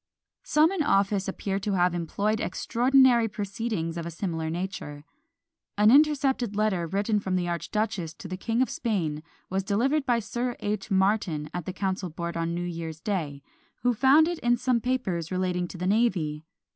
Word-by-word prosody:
Some 310 +3 +3
in 385 -4 -1
office 200 -8 +2
appear 195 0 -2
to 200 +1 -2
have 180 -1 +2
employed 200 +6 -1
extraordinary 250 -1 +3
proceedings 200 -4 -3
of 170 - -4
a - - -3
similar 165 -2 -3
nature. 160 -4 -5 0.7
An 210 +1 +6
intercepted 270 -6 +3
letter 200 -5 +1
written 205 +4 0
from 190 -2 -2
the 180 -1 0
archduchess 175 0 -2
to - - -9
the 185 - -4
King 230 +6 0
of - - -3
Spain, 170 -10 -2 0.3
was 190 +1 +1
delivered 265 +9 +1
by 240 -2 +3
Sir 240 +2 -3
H. 205 +1 -3
Martyn 190 -6 +1
at 175 -2 -4
the - - -1
council 190 -1 -2
board 170 +1 -5
on 165 0 -1
New 175 - -2
Year's 165 -2 -5
day, 155 -8 -3 0.4
who 245 0 +3
found 275 +7 +5
in 345 -1 -3
it 240 - 0
some 245 -2 +1
papers 190 -11 -2
relating 180 -1 -1
to 180 - -9
the 180 - -3
navy. 185 -8 +1
195 Hz, 175 wpm, -27 LUFS, 170-235 Hz, 0.7 s, An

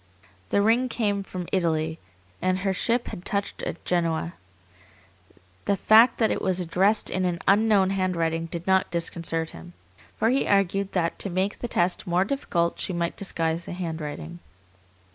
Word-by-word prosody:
The 200 - +2
ring 235 +4 +3
came 205 -4 0
from 185 -2 -6
Italy, 160 -3 0 0.4
and 185 0 +1
her 195 - +2
ship 235 +5 0
had 175 - -8
touched 200 +1 -3
at - - -5
Genoa. 170 -1 0 1.3
The 200 - +2
fact 225 +4 +6
that 225 - +2
it - - -1
was 185 -1 +1
addressed 185 +5 +1
in 185 - -1
an 175 -1 0
unknown 200 -2 +4
handwriting 170 -4 -1
did 170 +1 -6
not 190 0 +2
disconcert 165 -1 -1
him, 80 +1 -12 0.4
for 225 - +2
he 270 - +1
argued 195 0 +1
that 170 -3 0
to 200 - -1
make 190 +3 -1
the 240 - -3
test 180 -5 0
more 180 +2 +2
difficult 175 -9 -1
she 185 - -2
might 170 0 -2
disguise 165 -4 -2
the - - -6
handwriting. 155 - -5
185 Hz, 160 wpm, -25 LUFS, 170-200 Hz, 1.3 s, fact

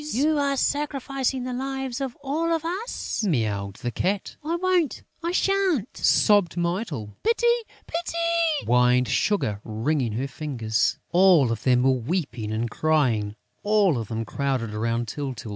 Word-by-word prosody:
"You 300 +3 +2
are 280 -1 +1
sacrificing 275 -3 -1
the 250 0 -4
lives 265 0 -3
of 265 -3 -4
all 315 +5 -1
of 325 -1 0
us," 375 - -3
mewed 105 - -1
the 120 +1 -4
Cat. 190 - -2
"I 325 +3 -1
won't! 360 -3 +1 0.2
I 340 +1 -1
sha'n't!" 370 - +1
sobbed 205 -6 +3
Mytyl. 170 - -3
"Pity! 465 +2 +1 0.4
Pity!" 335 -2 0
whined 125 +1 +4
Sugar, 110 - 0
wringing 115 +2 -1
his 135 +5 -3
fingers. 120 -7 -1
All 175 -8 +5
of 115 - -3
them 125 -1 +3
were 135 - +5
weeping 125 - -2
and 110 +2 -1
crying, 120 -9 +1 0.3
all 205 - +3
of 110 - -5
them 115 +1 -3
crowded 130 -5 -2
round 115 +2 -1
Tyltyl. 130 -3 -5
175 Hz, 145 wpm, -25 LUFS, -, 0.4 s, All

